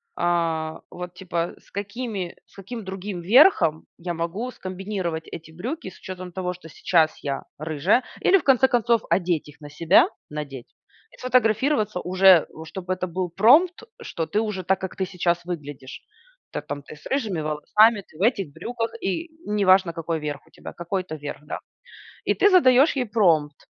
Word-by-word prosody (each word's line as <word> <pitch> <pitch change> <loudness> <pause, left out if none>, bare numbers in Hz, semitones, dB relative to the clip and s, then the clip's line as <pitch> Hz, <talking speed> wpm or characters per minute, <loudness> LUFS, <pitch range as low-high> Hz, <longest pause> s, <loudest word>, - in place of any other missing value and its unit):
а, 165 -2 -1
вот, 180 0 -7
типа: 175 -2 -3
"С - - -26
какими 205 -2 -4
с - - -26
каким 210 +3 -7
другим 190 -1 -5
верхом 180 - +5
я 175 0 -4
могу 170 +9 -3
скомбинировать 185 -5 -4
эти 160 -1 -9
брюки 215 - -5
с 185 - -16
учетом 185 -1 -8
того, 180 0 -3
что 175 -2 -13
сейчас 160 0 +2
я 140 -1 -3 0.2
рыжая?" 160 - +1 0.2
Или, 390 - +5
в - - -4
конце 265 -1 +5
концов, 235 -2 +2
одеть 175 -5 +1
их 150 - -16
на 145 - -9
себя, 160 +2 +4 0.2
надеть, 140 -4 -6 0.4
и - - -18
сфотографироваться 225 -3 +2
уже. 185 -2 +5 0.2
Чтобы 185 +3 -4
это 185 0 -3
был 180 +1 -3
промпт, 285 - +4 0.2
что 165 - -4
ты 210 - 0
уже 210 -4 -3
так, 190 +2 +1
как 190 - -5
ты 190 - -1
сейчас 175 -2 -1
выглядишь. 145 -6 -7 0.5
Так, 150 - -6
там, 145 0 -5
ты 155 - -11
с 150 - -19
рыжими 220 - -1
волосами, 200 +8 +3
ты 155 - -18
в 180 - -9
этих 200 - +1
брюках, 230 +7 -4
и 325 - -2 0.2
не 210 -1 0
важно 185 -2 +5
какой 165 -1 -3
верх 150 -1 -5
у - - -24
тебя, - - -10
какой-то 180 -1 -4
верх, 145 -1 -7
да. - - -5 0.7
И - - +2
ты 410 - +4
задаешь 280 -6 +6
ей 255 - +1
промпт: 165 -9 +2
185 Hz, 175 wpm, -24 LUFS, 165-215 Hz, 0.7 s, задаешь